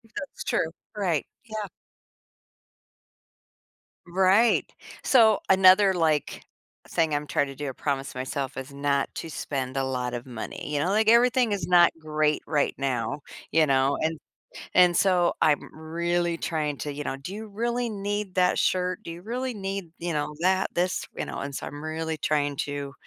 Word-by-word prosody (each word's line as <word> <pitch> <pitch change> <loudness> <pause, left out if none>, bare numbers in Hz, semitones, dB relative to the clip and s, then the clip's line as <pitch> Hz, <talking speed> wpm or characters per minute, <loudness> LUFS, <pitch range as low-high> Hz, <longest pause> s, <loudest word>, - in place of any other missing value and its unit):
That's 275 - -6
true. 160 - 0 0.3
Right. 175 -8 0 0.2
Yeah. 215 -2 -5 2.4
Right. 190 +6 +3 0.3
So, 220 -5 +5
another, 190 +1 +6
like, 160 -4 0 0.4
thing 160 -2 +1
I'm 145 0 -2
trying 145 0 0
to 135 - -8
do- 145 +1 -5
I - - -3
promised 135 0 -3
myself- 130 +1 -4
is 135 +1 -6
not 140 0 0
to 165 - -5
spend 135 -3 -4
a 135 - 0
lot 125 -2 -2
of 120 +1 -5
money, 120 +4 -6
you 145 - 0
know? 170 - 0
Like, 215 +2 +2
everything 240 0 +4
is 190 -5 -2
not 175 -1 +7
great 155 -1 0
right 150 -3 0
now. 130 -1 -2 0.3
You 160 -1 +4
know? 135 0 +2
And 160 0 -1 0.6
and 180 -1 +6
so, 180 -3 +3
I'm 150 -2 +1
really 170 +2 -1
trying 155 -3 -2
to, 145 - -4
you 145 +1 -6
know, 135 - -3
"Do 140 +7 -8
you 220 +1 -6
really 235 +3 -1
need 205 -2 -3
that 180 -1 +3
shirt? 180 0 +1
Do - - -6
you 170 - -10
really 250 +4 -3
need, 195 -4 -5
you 170 0 -3
know, 150 0 -2
that, 190 +2 +1
this?" 180 +1 0
You - - -2
know? - - -6
And 140 0 -5
so - - -5
I'm 145 0 -8
really 160 0 -3
trying 145 -1 0
to 145 -1 -5
160 Hz, 170 wpm, -26 LUFS, 145-190 Hz, 2.4 s, not